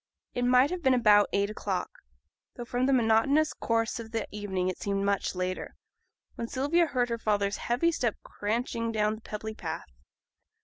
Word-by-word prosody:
It 245 - 0
might 255 +4 +5
have 365 -1 -3
been 265 -4 +4
about 210 -4 +5
eight 200 +1 +1
o'clock 195 -3 -4 0.6
though 240 - -6
from 245 +2 0
the - - +3
monotonous 260 +6 +3
course 230 0 -1
of 225 -1 -7
the 225 -1 -3
evening 195 -3 -2
it 185 - -3
seemed 200 0 -1
much 200 -1 0
later 185 0 -3 0.6
when 230 - -5
Sylvia 300 +8 +2
heard 250 -4 0
her 230 0 -2
father's 205 -2 0
heavy 250 +8 +1
step 240 -8 -1
cranching 230 +2 -2
down 215 -1 +1
the 220 - -9
pebbly 220 0 -6
path. 160 - -6
225 Hz, 175 wpm, -29 LUFS, 205-250 Hz, 0.6 s, might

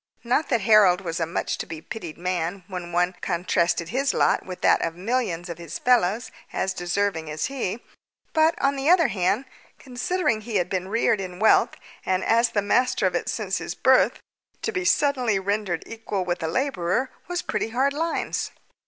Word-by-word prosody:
Not 250 +6 +1
that 240 -4 +2
Harold 195 -3 +5
was 165 -3 -4
a 165 - 0
much 165 - -2
to - - -4
be 165 -1 -6
pitied 170 -2 -8
man 180 +1 -2
when 180 -3 -6
one 180 +1 +1
contrasted 170 -1 0
his 270 +6 0
lot - - +2
with 185 -1 -8
that - - +4
of 165 - -2
millions 185 -3 -2
of 170 -1 -7
his 170 -1 -6
fellows 235 -2 +2 0.2
as 190 - -1
deserving 175 -2 -1
as 155 0 -2
he; 240 -4 -3 0.5
but, 320 +1 +3
on 275 +1 +2
the 275 +3 0
other 340 -6 +5
hand, 200 +5 0 0.3
considering 250 -1 -1
he 225 0 -6
had 180 -2 +1
been 185 -1 -1
reared 215 0 +1
in 180 -2 -6
wealth 220 +3 +4 0.3
and 185 0 0
as 230 +1 +3
the 205 - 0
master 250 +5 +2
of - - +2
it - - -1
since - - -2
his - - -5
birth, - - +4 0.4
to 445 - 0
be 370 -3 -2
suddenly 265 - +2
rendered 200 -1 -1
equal 215 -4 -4
with 175 0 -2
a 160 - -1
labourer 245 - 0 0.2
was 355 0 -2
pretty 210 +1 -2
hard 265 +5 +1
lines. 325 +3 -2
205 Hz, 190 wpm, -24 LUFS, 175-250 Hz, 0.5 s, Harold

